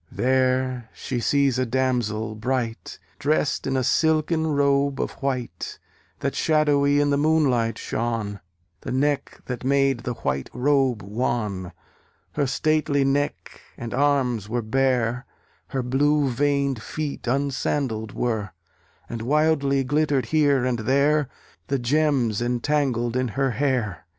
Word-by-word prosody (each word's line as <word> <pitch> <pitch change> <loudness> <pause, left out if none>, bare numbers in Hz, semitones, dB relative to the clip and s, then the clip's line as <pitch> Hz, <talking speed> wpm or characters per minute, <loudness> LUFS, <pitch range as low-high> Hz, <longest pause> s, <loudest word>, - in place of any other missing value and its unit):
There 130 -2 +1
she 125 - -3
sees 140 0 +2
a 130 - +1
damsel 115 -4 0
bright, 115 +1 -3 0.2
Drest 150 -1 0
in 135 0 0
a 130 - +1
silken 160 +3 +2
robe 140 -2 +2
of - - -1
white, 130 -3 -3 0.4
That - - -1
shadowy 145 -2 +3
in 145 0 +2
the 140 - +2
moonlight 140 -7 +2
shone: 115 -3 -3 0.4
The - - -6
neck 140 +2 -1
that 125 -1 -5
made 135 -1 +2
that 120 -1 -6
white 65 0 -1
robe 130 -4 +1
wan, 105 -3 -2 0.6
Her 145 -2 0
stately 145 0 +1
neck, 145 +1 -2 0.2
and 115 -1 -6
arms 130 -6 +1
were 120 +1 -1
bare; 125 0 0 0.4
Her 130 -2 -2
blue 145 +3 +2
veined 140 -1 0
feet 150 -2 -5
unsandal'd 130 -4 -1
were, 110 -5 -2 0.5
And 115 -1 -5
wildly 140 0 +2
glittered 145 0 +1
here 145 -5 +3
and 125 -2 0
there 140 +4 +2 0.4
The 140 - 0
gems 130 -4 +1
entangled 120 -1 0
in 130 0 +1
her 135 +4 0
hair. 120 -8 -1
130 Hz, 130 wpm, -24 LUFS, 120-145 Hz, 0.6 s, shadowy